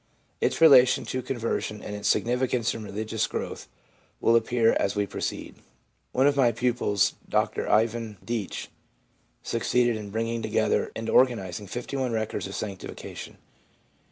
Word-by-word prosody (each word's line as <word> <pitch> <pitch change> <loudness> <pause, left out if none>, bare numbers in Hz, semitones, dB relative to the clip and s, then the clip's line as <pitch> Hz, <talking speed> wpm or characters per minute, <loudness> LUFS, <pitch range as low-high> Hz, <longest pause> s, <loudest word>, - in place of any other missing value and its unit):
Its - - 0
relation 130 -6 +7
to 130 - -3
conversion 115 -4 -3
and 105 - -5
its 105 - -3
significance 125 -1 +1
in 115 - -6
religious 110 +1 -2
growth - - -5 0.5
will 115 - +4
appear 115 0 +3
as 100 - 0
we 105 0 +1
proceed. - - -5 0.5
One 130 - +2
of 145 0 +4
my 130 -4 +4
pupils, 115 -4 +1 0.2
Mr - - 0
Ivan 110 -1 +1
Deach, 115 -5 -4 0.7
succeeded 120 -2 +1
in 105 -1 -7
bringing 115 +2 -2
together - - +1
and 115 0 -4
organising 105 -7 +2
51 125 +2 -3
records 110 -2 -2
of 100 - -8
sanctifica 100 -3 -6
tion. - - -9
115 Hz, 140 wpm, -26 LUFS, 105-125 Hz, 0.7 s, relation